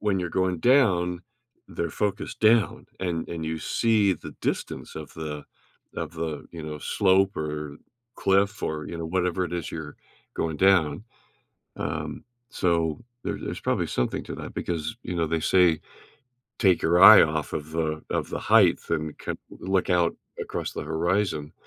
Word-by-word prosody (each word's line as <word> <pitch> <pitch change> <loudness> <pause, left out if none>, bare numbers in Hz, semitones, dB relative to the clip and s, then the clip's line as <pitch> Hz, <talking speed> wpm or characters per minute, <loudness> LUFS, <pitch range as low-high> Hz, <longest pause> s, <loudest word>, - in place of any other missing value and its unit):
When 105 -2 +1
you're 85 - -3
going 95 -1 0
down, 90 - +3 0.5
they're 85 -2 -3
focused 100 +5 -3
down, 110 -1 +3
and 85 -3 -2
and 80 -1 -4
you 80 0 -2
see 110 -4 +2
the - - -10
distance - - -3
of 75 -2 -8
the 75 -2 -6 0.5
of - - -4
the, 80 -2 -4
you 85 -2 -7
know, 75 -1 -6
slope, 95 +5 +2
or 75 -1 -4 0.4
cliff 100 +1 +2
or, 75 -1 -3
you 85 - -6
know, 80 - -4
whatever 90 +1 0
it 90 - -6
is 85 - -4
you're 75 -2 -7 0.4
going 80 -1 -2
down. 90 -1 +3 0.7
Um, 75 0 -4 0.3
so 85 -4 0 0.2
there - - -2
there's - - -5
probably - - 0
something 60 - -1
to - - -7
that - - -8
because, 85 +4 -3
you 90 - -4
know, 85 -1 0
they 80 +1 0
say, 85 -1 +4 0.8
"Take 95 -6 +4
your 85 +2 +3
eye 105 +2 +11
off 75 -1 -1
of 75 +1 -4
the 80 -1 -1
of - - -1
the - - -3
heighth - - +4
and 75 -1 -2
kin - - -4
look 95 0 -1
out 85 -2 +3 0.3
across - - -4
the - - -5
horizon." 80 0 -1
85 Hz, 165 wpm, -26 LUFS, 80-95 Hz, 0.8 s, eye